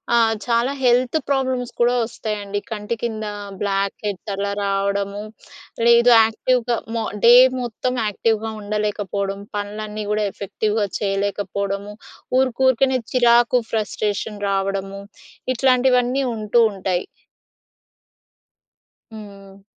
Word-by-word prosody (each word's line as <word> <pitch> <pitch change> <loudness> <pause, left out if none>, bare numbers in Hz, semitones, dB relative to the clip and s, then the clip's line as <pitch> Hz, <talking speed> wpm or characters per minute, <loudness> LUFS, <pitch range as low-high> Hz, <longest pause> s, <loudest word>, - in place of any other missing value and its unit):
ఆహ్, 225 -1 +4
చాలా 235 +3 +1
health 250 +4 +3
problems 260 -3 0
కూడా 240 +1 +3
వస్తాయండి. 210 -3 -4
కంటి 210 +1 -3
కింద 220 -2 -3 0.4
బ్లాక్ 195 -1 0
హెడ్స్ 200 0 -4
అలా 200 0 -2
రావడము, 200 +1 -1 0.6
లేదు 235 +1 +6
యాక్టివ్‍గా 235 +2 0 0.2
మో 225 - -1 0.2
డే 240 - +9 0.3
మొత్తం 245 +2 -3
యాక్టివ్‍గా 220 +1 -1
ఉండలేకపోవడం, 205 -1 -2 0.2
పనులన్నీ 210 +1 -5
కూడా 210 0 +1
ఎఫెక్టివ్‍గా 210 +1 -2
చేయలేకపోవడము, 200 0 -2 0.5
ఊరుకు 260 -1 0
ఊరుకునే 260 0 +3
చిరాకు, 240 0 +4
ఫ్రస్ట్రేషన్ 210 -1 -2
రావడము. 195 0 -2 0.5
ఇట్లాంటివన్నీ 255 +1 +2
ఉంటూ 215 +2 +1
ఉంటాయి. 185 -2 -2 2.1
హ్మ్. 200 -2 -12
215 Hz, 95 wpm, -21 LUFS, 200-240 Hz, 2.1 s, డే